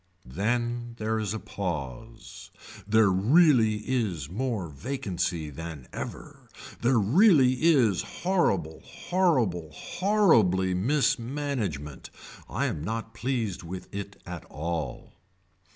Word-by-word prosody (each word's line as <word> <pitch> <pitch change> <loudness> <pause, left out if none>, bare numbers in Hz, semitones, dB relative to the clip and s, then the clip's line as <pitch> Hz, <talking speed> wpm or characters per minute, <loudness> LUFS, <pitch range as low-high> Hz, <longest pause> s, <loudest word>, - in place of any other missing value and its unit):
Then 120 - -2
there 110 0 -1
is 105 -3 -2
a 110 - -2
pause. 90 - -6 0.4
There 110 -2 +4
really 110 - +4
is 95 - -1
more 110 -4 -2
vacancy 90 - -3
than 80 -3 -8
ever. - - -8 0.3
There 120 +1 +3
really 135 - +5
is 130 - +4
horrible 100 - 0
horrible 125 - 0
horribly 115 - +2
mismanagement. 115 - -1 0.4
I - - -1
am 75 - -3
not 115 +4 -4
pleased 115 -5 -2
with 90 +2 -8
it 100 0 -6
at 90 -2 -7
all. 80 -4 -5
110 Hz, 105 wpm, -27 LUFS, 90-130 Hz, 0.4 s, really